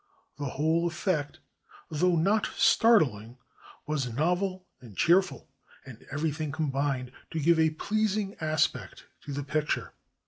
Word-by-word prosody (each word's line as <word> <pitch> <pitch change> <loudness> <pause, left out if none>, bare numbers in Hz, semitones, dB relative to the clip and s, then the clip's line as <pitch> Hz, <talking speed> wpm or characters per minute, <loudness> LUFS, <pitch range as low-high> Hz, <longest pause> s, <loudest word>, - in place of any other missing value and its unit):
The 145 - -4
whole 160 +3 +2
effect, 160 -3 -2 0.5
though 175 +3 +2
not 200 +6 +2
startUng, 130 - +3 0.5
was 140 -5 -2
novel 180 - -1
and 115 -6 -14
cheerful, 185 +3 +2 0.4
and 125 -4 -12
everything 150 +1 -2
com 155 -1 -2
bined 135 -2 -1 0.2
to 160 - -3
give 165 +2 +3
a 160 0 +4
pleasing 205 +4 -1
aspect 155 - -1 0.2
to 145 - -6
the 140 +1 -3
picture. 150 +1 -2
155 Hz, 130 wpm, -28 LUFS, 140-180 Hz, 0.5 s, a